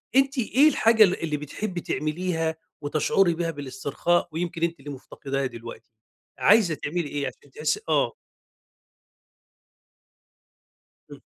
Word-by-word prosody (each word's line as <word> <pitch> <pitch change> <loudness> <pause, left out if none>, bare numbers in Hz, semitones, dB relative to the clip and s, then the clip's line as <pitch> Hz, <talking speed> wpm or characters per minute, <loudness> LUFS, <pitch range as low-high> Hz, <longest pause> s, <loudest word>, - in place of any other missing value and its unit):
أنتِ 270 +1 +3
إيه 260 +5 +4
الحاجة 225 -5 +5
اللي 185 -2 +3
اللي 150 -2 -1
بتحبي 175 +5 -5
تعمليها 160 0 -2 0.2
وتشعري 155 +5 +2
بيها 165 -1 -1
بالاسترخاء، 145 +5 -1
ويمكن 165 0 -3
أنتِ 170 -2 0
اللي 145 +1 -8
مفتقداها 135 0 -4
دلوقتي؟ 115 -1 -10 0.5
عايزة 200 -5 +5
تعملي 160 +2 -3
إيه 145 -1 -2
عشان 140 - -11
تحسّي 155 +2 -1
آه. 145 -6 +2 3.0
إمم. - - -11
160 Hz, 115 wpm, -25 LUFS, 145-180 Hz, 3.0 s, الحاجة